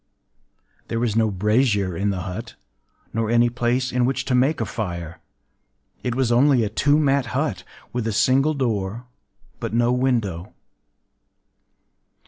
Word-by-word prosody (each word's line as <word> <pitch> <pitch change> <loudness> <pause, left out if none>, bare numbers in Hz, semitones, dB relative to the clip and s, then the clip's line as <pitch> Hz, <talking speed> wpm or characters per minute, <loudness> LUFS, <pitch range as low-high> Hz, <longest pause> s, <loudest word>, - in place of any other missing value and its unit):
There 115 - -2
was 115 -3 0
no 110 -1 +3
brazier 105 -1 +1
in 100 +4 0
the 95 -2 -2
hut, 90 +1 -6 0.6
nor 115 -1 -1
any 120 +1 +4
place 120 +1 0
in 125 0 +1
which 130 +2 0
to 130 - -1
make 135 +5 +2
a 115 - 0
fire: 85 -6 -5 0.8
it 125 -1 -2
was 130 -2 +1
only 125 0 +4
a 105 - -1
two 145 +7 +2
mat 140 -4 +2
hut, - - -1 0.3
with 120 -2 -2
a - - 0
single 135 +8 +2
door, 115 -3 -2 0.5
but - - -4
no 120 +1 +3
window. 115 -8 -1
120 Hz, 145 wpm, -22 LUFS, 105-130 Hz, 0.8 s, any